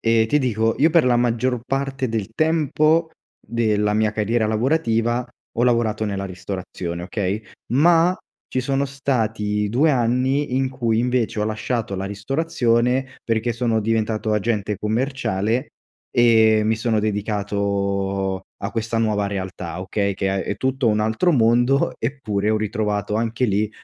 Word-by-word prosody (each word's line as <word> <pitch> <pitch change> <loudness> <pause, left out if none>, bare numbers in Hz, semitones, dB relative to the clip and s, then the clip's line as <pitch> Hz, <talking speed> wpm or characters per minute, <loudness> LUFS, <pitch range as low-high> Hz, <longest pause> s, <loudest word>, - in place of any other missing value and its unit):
E 115 -1 +3
ti 150 - +3
dico, 115 -4 +1
io 160 +4 +4
per 165 -1 +4
la 125 -1 +3
maggior 120 +1 +1
parte 135 0 -2
del 110 -2 -3
tempo, 160 +1 +2 0.3
della 105 -2 0
mia 110 0 +2
carriera 110 +1 0
lavorativa, 120 0 +1 0.3
ho 120 - +1
lavorato 115 -3 +1
nella 100 -2 -3
ristorazione, 90 -2 -5
okay, 100 +3 -2 0.3
ma, 170 +6 +4 0.4
ci - - 0
sono 135 +1 0
stati 110 -6 -1
2 140 +9 +3
anni 130 +2 +1
in 130 -1 0
cui, 120 -4 0
invece, 125 -2 0
ho 105 - +1
lasciato 110 0 -2
la 95 0 -3
ristorazione, 125 +3 0
perché 115 +1 0
sono 115 -1 0
diventato 110 0 0
agente 105 -1 0
commerciale, 110 0 -1 0.4
e 110 -2 +5
mi 110 +1 +2
sono 110 0 0
dedicato 100 -2 -1 0.2
a 100 - -2
questa 115 0 -2
nuova 105 -3 +1
realtà, 95 -3 -5
okay, 100 +1 -1
Che 95 0 -1
ha 95 - 0
è - - -3
tutto 130 -2 0
un 105 -1 +2
altro 110 +12 +1
mondo, 120 0 +3
eppure 110 -5 -2
ho 110 - +2
ritrovato 105 -1 -1
anche 115 +2 0
lì 105 -1 +1
115 Hz, 145 wpm, -22 LUFS, 105-125 Hz, 0.4 s, e